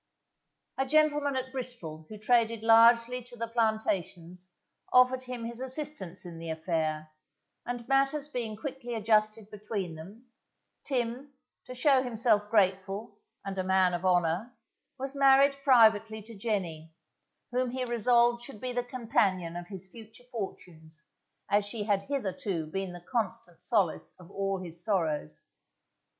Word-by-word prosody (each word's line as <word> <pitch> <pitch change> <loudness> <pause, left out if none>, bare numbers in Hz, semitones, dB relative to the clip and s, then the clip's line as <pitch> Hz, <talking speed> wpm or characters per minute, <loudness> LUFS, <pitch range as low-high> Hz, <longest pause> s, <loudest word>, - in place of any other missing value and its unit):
A 270 - +2
gentleman 295 -1 +3
at 260 0 -3
Bristol 235 - -6
who 215 - -8
traded 230 0 +2
largely 230 +2 +6
to 245 - -13
the 230 0 -3
plantations 185 -6 -2 0.4
offered 255 0 +5
him 250 -2 -5
his 235 0 -6
assistance 260 - -4
in 170 -2 -8
the 165 0 -6
affair, 160 -1 -2 0.6
and 245 -1 -4
matters 275 +2 +2
being 235 -6 -4
quickly 245 0 -5
adjusted 215 -1 +1
between 205 -4 -4
them, 195 +10 -11 0.6
Tim, 255 +1 -2 0.3
to 255 - -8
show 265 +1 +4
himself 225 -4 +1
grateful, 195 0 0 0.3
and 195 -1 -4
a - - 0
man 185 -1 +3
of 175 +1 -3
honour, 180 +6 +1 0.4
was 270 +1 -5
married 275 0 +5
privately 220 -4 +4
to 230 +2 -12
Jenny, 175 -7 -3 0.6
whom 250 0 0
he 255 +1 -3
resolved 240 0 +3
should 240 -4 -9
be 250 +1 -4
the 245 0 0
companion 215 -8 0
of 175 0 -6
his 190 -1 -7
future 220 +4 -14
fortunes, 165 -8 -7 0.5
as 205 +1 +3
she 205 +1 -4
had 205 -2 +1
hitherto 195 - -3
been 190 +4 -4
the 175 0 -11
constant 185 -7 -3
solace 190 -3 0
of 180 +1 -14
all 195 0 -1
his 170 -1 -7
sorrows. 165 - -1
220 Hz, 140 wpm, -29 LUFS, 185-245 Hz, 0.6 s, largely